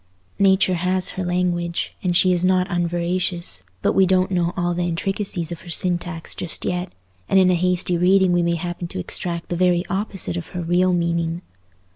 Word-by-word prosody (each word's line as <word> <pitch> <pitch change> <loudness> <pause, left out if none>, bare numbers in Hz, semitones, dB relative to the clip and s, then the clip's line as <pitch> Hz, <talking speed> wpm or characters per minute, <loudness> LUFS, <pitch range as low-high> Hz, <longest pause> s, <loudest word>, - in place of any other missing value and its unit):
Nature 190 -1 +4
has 185 +1 0
her 190 - -4
language, 175 -1 -1
and 175 -2 +1
she 185 0 +4
is 175 0 0
not 185 0 +3
unveracious; 175 - -1 0.2
but - - +2
we 190 -1 +4
don't 185 +1 +2
know 175 -2 +1
all 175 -1 0
the 175 - -2
intricacies 175 0 -2
of 170 - -6
her 175 - -12
syntax 175 -1 -1
just 175 - -1
yet, 180 +1 -2 0.4
and 195 - +5
in 185 -1 +5
a - - +3
hasty 180 0 +1
reading 190 +1 +4
we 175 0 +3
may 170 0 +1
happen 175 +1 -4
to - - -7
extract 170 - -3
the 175 - -1
very 180 0 +2
opposite 195 -3 -3
of 170 - -5
her - - -2
real 180 +2 +2
meaning. 170 0 -1
175 Hz, 190 wpm, -22 LUFS, 170-185 Hz, 0.4 s, and